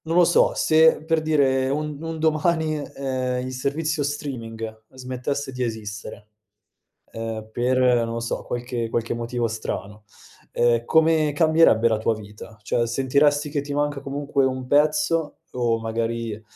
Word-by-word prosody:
Non 165 +2 -1
lo 180 - +7
so, 175 - +4
se, 160 0 +4
per 160 -1 +1
dire, 135 -4 +2
un 150 0 -2
un 165 -1 -4
domani, 160 0 +1
ehm, 130 -3 -3
il 130 - -5
servizio 150 +4 -1
streaming, 130 -6 -5
ehm 110 +2 -9
smettesse 130 +2 -4
di 125 0 -4
esistere, 105 -2 -6 0.8
ehm, 110 -1 -5
per 125 +3 +1
non 120 -2 +3
lo 115 - -2
so, 120 - -3
qualche 120 -1 -3
qualche 115 0 -1
motivo 120 0 -2
strano, 105 -1 -6 0.5
ehm, 120 -1 +2
come 160 -2 +3
cambierebbe 155 -8 +4
la 110 - +1
tua 110 +1 0
vita? 105 +1 -11
Cioè 120 +3 0
sentiresti 145 +4 +2
che 145 -1 -1
ti 145 0 -6
manca 145 -1 -1
comunque 140 0 -1
un 130 -1 -2
pezzo, 150 +2 +2
o 120 -2 0
magari, 115 -1 -3
130 Hz, 150 wpm, -23 LUFS, 115-150 Hz, 0.8 s, lo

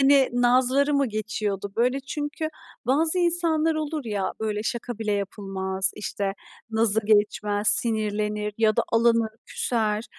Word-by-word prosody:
hani, 275 -1 +5
nazları 255 +4 +3
mı 280 -1 +3
geçiyordu? 210 -2 -3
Böyle 250 +4 +2
çünkü 295 +3 -4 0.4
bazı 315 +7 +2
insanlar 330 -2 +2
olur 310 -1 -3
ya 205 -4 -2
böyle 210 -1 -1
şaka 235 -1 -4
bile 215 -2 -1
yapılmaz, 195 -1 -2
işte 200 -1 -3 0.4
nazı 220 -1 +2
geçmez, 205 0 +2
sinirlenir 210 -2 0
ya 220 -1 +3
da - - +3
alınır, 230 -1 +3 0.2
küser, 220 -2 -1
225 Hz, 130 wpm, -25 LUFS, 210-270 Hz, 0.4 s, hani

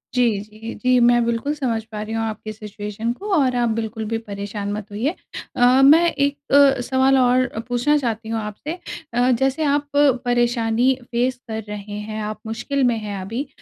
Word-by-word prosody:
जी, 235 -5 +2
जी, 215 +2 -8
जी 255 0 +4
मैं 240 0 +4
बिल्कुल 235 +5 -1
समझ 245 -7 -2
पा 210 -1 -5
रही 215 +1 -5
हूँ 225 - -1
आपकी 215 0 -5
सिचुएशन 210 +1 -5
को 405 +11 -7
और 260 -5 +2
आप 240 -1 +1
बिल्कुल 220 0 -3
भी 225 - 0
परेशान 200 0 -4
मत 210 0 -6
होइए। 245 - -1 0.4
अ, 250 +2 +5
मैं 325 +5 +6
1 280 0 0 0.2
अ, 275 -3 +6
सवाल 265 +1 +3
और 255 0 +3 0.2
पूछना 245 +5 +2
चाहती 230 -5 -3
हूँ 225 0 -1
आपसे 215 - -6 0.4
अ, 245 +2 +3
जैसे 270 +5 +1
आप 290 0 +1
परेशानी 245 -3 +2 0.2
फेस 245 +2 0
कर 220 0 -4
रहे 205 0 -6
हैं, 215 +1 -5
आप 215 0 -5
मुश्किल 245 +5 -2
में 240 -2 +2
हैं 205 -2 -5
अभी। 230 +9 -4
240 Hz, 185 wpm, -21 LUFS, 220-265 Hz, 0.4 s, मैं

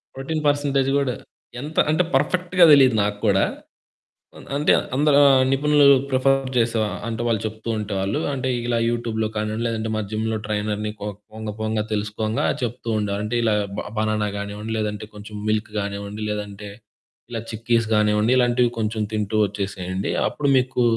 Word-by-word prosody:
Protein 155 +4 -3
percentage 140 -2 +1
కూడా 135 -3 0 0.5
ఎంత 150 +3 -8
అంటే 160 +4 +3
పర్ఫెక్ట్‌గా 180 +5 +3
తెలీదు 135 -5 +6
నాకు 105 0 -2
కూడా. 95 -2 +4 0.9
అన్ - - -13
అంటే 150 - +4 0.2
అందరా 145 +1 +4
ఆహ్, 135 -1 +5
నిపుణులు 145 +1 +4 0.2
ప్రిఫర్ 135 0 +2
చేసే 115 -1 +2 0.3
అంటే 115 0 -3
వాళ్ళు 115 -3 +1
చెప్తూ 110 +1 -5
ఉంటేవాళ్ళు 100 -1 -2
అంటే 130 -1 -2 0.2
ఇలా 120 -1 +1
యూట్యూబ్‌లో 115 -2 -1
కానివ్వండి 110 +2 -2
లేదంటే 110 -1 -2
మా 110 - 0
జిమ్‌లో 110 +1 -1
ట్రైనర్‌ని 105 0 -2
పో 105 - -3 0.2
పోంగ 110 0 -6
పోంగ 110 0 -1
తెలుసుకొంగా 105 +1 -1 0.2
చెప్తూ 120 0 -4
ఉండేవాళ్ళు. 105 0 -2
అంటే 120 +3 -1
ఇలా 110 -2 +2 0.3
బ - - -1 0.2
బనానా 110 -1 0
గానివ్వండి 105 +2 -5
లేదంటే 105 0 -3
కొంచెం 105 +1 -10
మిల్క్ 110 0 -1
గానివ్వండి 100 +1 -5
లేదంటే 105 -1 -5 0.6
ఇలా 115 - -3
చిక్కీస్ 115 0 0
గానివ్వండి 105 +2 +3
ఇలాంటివి 120 -1 +3
కొంచెం 110 0 -1
తింటూ 105 0 -1
వచ్చేసేయండి. 95 -1 -4 0.2
అప్పుడు 145 -1 -1
మీకు 125 -1 +1
110 Hz, 150 wpm, -22 LUFS, 105-130 Hz, 0.9 s, తెలీదు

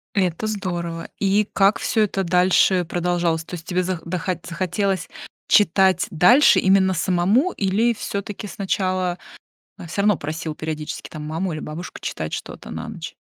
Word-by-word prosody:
Это 185 +1 0
здорово. 175 -5 -4
И 200 +1 +2
как 195 +1 +3
всё 220 - +1
это 195 -2 0
дальше 180 0 +3
продолжалось? 175 -2 0
То 180 - -8
есть 165 0 -8
тебе 185 0 0
зах 180 -2 -3
дохо 180 +1 -2
захотелось 185 +2 -1 0.4
читать 190 -1 +4
дальше 235 - +6
именно 190 0 +3
самому, 185 - +2
или 210 +5 +1
всё-таки 205 0 -5
сначала, 185 -2 -1 0.6
э, 170 - -8
всё 185 +5 -2
равно 210 -2 +4
просил 155 +1 -4
периодически 155 -1 -5
там 155 - -8
маму 165 +4 -2
или 155 - -5
бабушку 155 +4 -7
читать 80 -1 -4
что-то - - -7
на - - -6
ночь? - - -7
185 Hz, 155 wpm, -22 LUFS, 170-195 Hz, 0.6 s, дальше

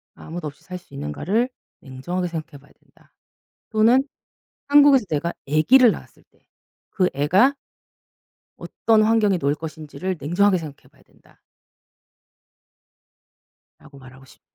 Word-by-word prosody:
아무도 165 -1 -8
없이 145 - -12
살 185 -1 -8
수 180 -5 -20
있는가를 180 - -2 0.3
냉정하게 175 +7 -5
생각해 160 -3 -7
봐야 140 - -23
된다. - - -30 0.6
또는 230 +4 +3 0.6
한국에서 285 -3 +5
내가 160 +3 -2 0.2
애기를 225 - +5
낳았을 - - -11
때. - - -35 0.5
그 185 -2 +1
애가 185 - +3 1.0
어떤 220 -1 +1
환경에 215 -3 +2
놓일 140 -1 0
것인지를 160 +4 -6
냉정하게 185 +6 +2
생각해 155 -4 -11
봐야 - - -26
된다 - - -27 2.4
라고 145 -2 -16
말하고 130 0 -16
싶 - - -20
175 Hz, 280 characters per minute, -22 LUFS, 145-215 Hz, 2.4 s, 한국에서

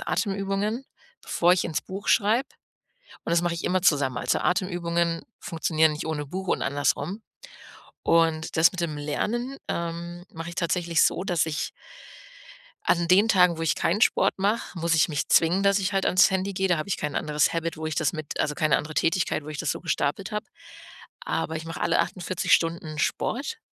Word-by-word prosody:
Atemübungen, 200 +4 -1 0.4
bevor 175 +1 +3
ich 180 - +1
in's 155 -1 -2
Buch 195 +2 -7
schreibe, 225 +5 +3 0.8
und - - -4
das 170 0 +3
mache 175 - 0
ich 170 - -5
immer 185 0 +1
zusammen. 140 -7 +2
Also, - - 0
Atemübungen 170 -2 0 0.2
funktionieren 160 -1 +1
nicht 150 - -5
ohne 150 -2 -2
Buch 185 +5 -6
und - - 0
andersrum. 145 +8 -1 0.8
Und 160 -1 +2
das 160 0 +6
mit 180 -2 -5
dem 155 -3 -2
Lernen, 240 - -2
ähm, 170 +1 -4
mache 165 +1 -6
ich 170 - -9
tatsächlich 170 -2 +1
so, 180 - +1
dass 175 -5 +1
ich 155 -2 -3 1.2
an 170 -1 +2
den 200 +5 +5
Tagen, 180 -5 +4
wo - - -3
ich 160 - +2
kein 190 +6 0
Sport - - +3
mache, 200 -1 -1
muss 165 0 +1
ich 160 - +4
mich 150 -1 -2
zwingen, 175 +4 +4
dass 200 0 +4
ich 195 0 -1
halt 195 -1 +1
an's 180 +3 +5
Handy 190 +1 -1
gehe. 190 0 0
Da 175 - +2
habe 155 - -4
ich 190 - 0
kein 150 -1 -4
anderes 150 -1 +1
Habit, 165 0 -2
wo 155 0 -5
ich 155 - -3
das 160 0 +1
mit 155 -3 -5
also, 150 - 0
keine 155 -4 +2
andere 155 +1 -7
Tätigkeit, 165 -2 0
wo - - -10
ich 155 0 -6
das 165 - -1
so - - -3
gestapelt 170 +3 -2
habe. 210 +1 -3 0.8
Aber 160 - -2
ich 160 - -6
mache 165 - -6
alle - - +2
48 185 -1 -2
Stunden 165 -2 +1
Sport 290 - -1
170 Hz, 195 wpm, -25 LUFS, 160-190 Hz, 1.2 s, das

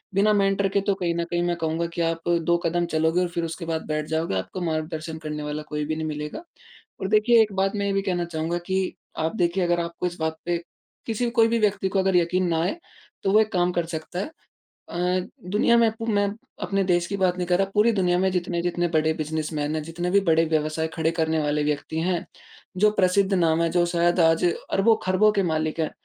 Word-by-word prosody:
बिना 210 +2 +4
मेंटर 195 -1 +2
के 200 - +4
तो 200 +1 +1
कहीं 175 -3 -1
न 170 - 0
कहीं 175 0 +1
मैं 175 - 0
कहूँगा 165 0 -1
कि 170 - -1
आप 165 0 -1
2 170 +1 +3
कदम 175 +1 +1
चलोगे 160 +3 +2
और 180 - +1
फ़िर 170 0 -3
उसके 165 +1 -6
बाद 165 -1 -3
बैठ 155 0 -1
जाओगे, 160 -7 -1
आपको 95 - -4
मार्गदर्शन 160 -1 -3
करने 150 -1 -4
वाला 150 +1 -4
कोई 150 0 -2
भी 155 +1 -2
नहीं 160 0 -3
मिलेगा। 150 - -5 0.6
और 190 - -1
देखिए 220 +2 +5
एक 215 -1 +1
बात 195 0 +1
मैं 200 -1 -1
ये 200 - 0
भी 195 - +1
कहना 180 -3 -1
चाहूँगा 165 0 -2
कि 190 0 -1 0.3
आप 160 +5 -1
देखिए 175 -1 +1
अगर 175 0 +1
आपको 170 +1 -4
इस 175 0 -6
बात 160 0 -1
पे, 175 0 0 0.5
किसी 235 +1 -1
कोई 230 -2 +4
भी 230 0 +1
व्यक्ति 205 -2 +1
को 195 0 0
अगर 190 -1 +2
यक़ीन 180 +1 +2
ना 165 -1 +1
आए 185 - -1 0.5
तो 195 - +2
वो 210 - +6
एक 215 0 -1
काम 180 -1 +2
कर 175 -1 -1
सकता 165 +2 -5
है। 195 - -1 0.7
अ, 180 +1 0 0.2
दुनिया 215 +4 +4
में, 230 -1 +4 0.2
मैं 205 -2 +2 0.4
अपने 195 -1 0
देश 175 -2 +2
की 200 - -3
बात 185 -2 +1
नहीं 180 - -1
कर 180 0 +2
रहा, 195 0 0
पूरी 215 +3 +4
दुनिया 180 -4 +2
में 190 +1 +2
जितने-जितने 175 -1 -1
बड़े 160 -1 +2
बिजनेसमैन 155 -1 -2
हैं, 155 - -2
जितने 170 +3 -4
भी 200 +2 +4
बड़े 165 +1 +4
व्यवसाय 155 0 0
खड़े 160 -1 +1
करने 160 0 +1
वाले 150 0 0
व्यक्ति 150 +1 -2
हैं, 175 0 -1 0.5
जो 210 +3 +4
प्रसिद्ध 190 +2 +3
नाम 165 -2 +2
है 165 - +2
जो 175 0 +2
शायद 175 +1 +2
आज 165 +1 +4
अरबों-खरबों 195 +2 +2
के 200 -2 +1
मालिक 155 0 -1
हैं, 155 - 0
175 Hz, 230 wpm, -24 LUFS, 160-195 Hz, 0.7 s, वो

